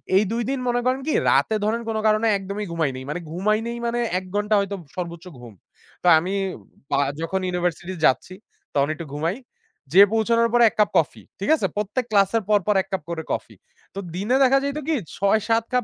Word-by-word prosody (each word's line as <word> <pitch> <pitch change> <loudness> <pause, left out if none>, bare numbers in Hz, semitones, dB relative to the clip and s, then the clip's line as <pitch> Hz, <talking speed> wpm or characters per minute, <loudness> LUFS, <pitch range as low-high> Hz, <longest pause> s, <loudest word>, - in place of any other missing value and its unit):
এই 200 - +5
২ 235 +1 -1
দিন 270 -1 -1
মনে 245 0 +1
করেন 260 +1 +1
কি 310 - +1 0.2
রাতে 220 - +3
ধরেন 230 +2 0
কোন 220 - -1
কারণে 215 +1 +3
একদমই 200 +2 -5
ঘুমাইনি। 140 -6 -1
মানে 160 - -3
ঘুমাই 210 +5 +1
নেই 235 - -4
মানে 235 +1 -1 0.2
১ 185 - -12
ঘন্টা 210 +1 +1
হয়তো 200 0 -2 0.2
সর্বোচ্চ 170 -1 -6
ঘুম। 120 -3 -11 0.5
তা - - +1
আমি 180 +4 -3 0.2
উম - - -18 0.3
বা - - +2 0.2
যখন 180 +4 -1
ইউনিভার্সিটি 180 0 -2
যাচ্ছি, 135 +7 +2 0.4
তখন 140 0 +2
একটু 170 - -7
ঘুমাই। 160 +6 -1 0.6
যেয়ে 195 +4 +8
পৌঁছানোর 230 +1 +2
পর 240 - +4
এক - - -20
কাপ 210 - +4
কফি, - - 0 0.2
ঠিক - - -3
আছে? - - -1
প্রত্যেক 210 +5 -2
ক্লাসের 205 +2 +3
পর, 205 -1 +5
পর 210 - +3
এক 195 - -11
কাপ 190 - -1
করে 160 -1 -4
কফি। - - -5 0.4
তো - - -3 0.2
দিনে 210 +7 0
দেখা 270 +1 +5
যাইতো 280 +2 -2
কি 320 - +2 0.2
৬-৭ 220 +3 +2
কাপ 250 - +2
205 Hz, 205 wpm, -23 LUFS, 180-230 Hz, 0.6 s, যেয়ে